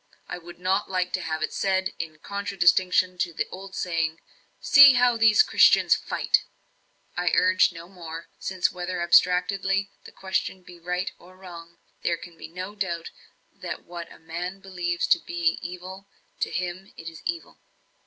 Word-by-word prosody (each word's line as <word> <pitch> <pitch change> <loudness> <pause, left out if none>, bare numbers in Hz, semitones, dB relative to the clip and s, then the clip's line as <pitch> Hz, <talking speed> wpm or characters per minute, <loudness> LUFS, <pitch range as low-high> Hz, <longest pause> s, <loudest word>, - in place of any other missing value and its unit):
I - - -6
would 175 0 -12
not 190 +3 0
like 185 -1 -1
to - - -1
have 155 -1 -3
it - - -2
said, 190 0 0
in 155 -1 -5
contradistinction 185 -1 +1
to 170 - -1
the - - -2
old 190 0 -9
saying, 165 -2 -1 0.4
'See 285 -1 +8
how 245 -1 +4
these 225 - +6
Christians - - +5
FIGHT!'" - - +1 0.7
I 175 -1 0
urged 185 0 +4
no 165 0 -10
more; 170 -3 -9
since, 185 -2 0
whether 180 0 -4
abstractedly 185 +3 +2
the - - -11
question 190 -1 -3
be 175 -1 -14
right 180 +2 -3
or 185 +1 -17
wrong, 170 -2 -12 0.2
there 170 - 0
can 170 0 -12
be - - -10
no 185 +4 -7
doubt 175 -5 -4 0.4
that - - -7
what 170 -1 -9
a - - -13
man 175 +4 -6
believes 175 -3 -2
to - - +4
be 170 -1 -1
evil, 185 +2 -8 0.3
to - - -1
him 180 +2 -4
it 165 - -9
is 165 0 -9
evil. 335 0 -5
180 Hz, 165 wpm, -25 LUFS, 170-190 Hz, 0.7 s, See